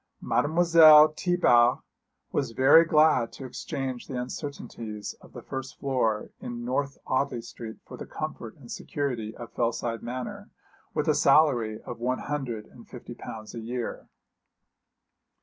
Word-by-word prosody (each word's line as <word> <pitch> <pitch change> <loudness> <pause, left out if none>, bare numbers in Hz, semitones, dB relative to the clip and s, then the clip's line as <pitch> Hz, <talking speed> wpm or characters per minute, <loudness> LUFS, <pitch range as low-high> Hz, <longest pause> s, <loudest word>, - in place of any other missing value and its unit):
Mademoiselle 155 -1 +6
Thiebart 135 -8 +3 0.5
was 115 - -1
very 135 +7 +7
glad 150 -7 +4
to 135 - -9
exchange 130 0 -5
the 130 -3 -4
uncertainties 115 -5 -6
of - - -18
a - - -8
first 130 0 -6
floor 120 -6 0
in 120 0 -6
North 140 +2 -2
Audley 130 -1 0
Street 115 -1 -9
for - - -10
the - - -8
comfort - - -6
and - - -13
security 120 -6 -4
of 120 -1 -10
Fellside 115 -1 -1
Manor, 125 +1 -6 0.5
with - - 0
a - - +4
salary 120 -9 +3
of 120 - -8
one 125 +2 0
hundred 125 -7 -4
and 120 +1 -17
fifty 120 -1 -9
pounds 110 -2 -9
a 115 - -6
year. 120 +1 -5
125 Hz, 140 wpm, -27 LUFS, 115-145 Hz, 0.5 s, very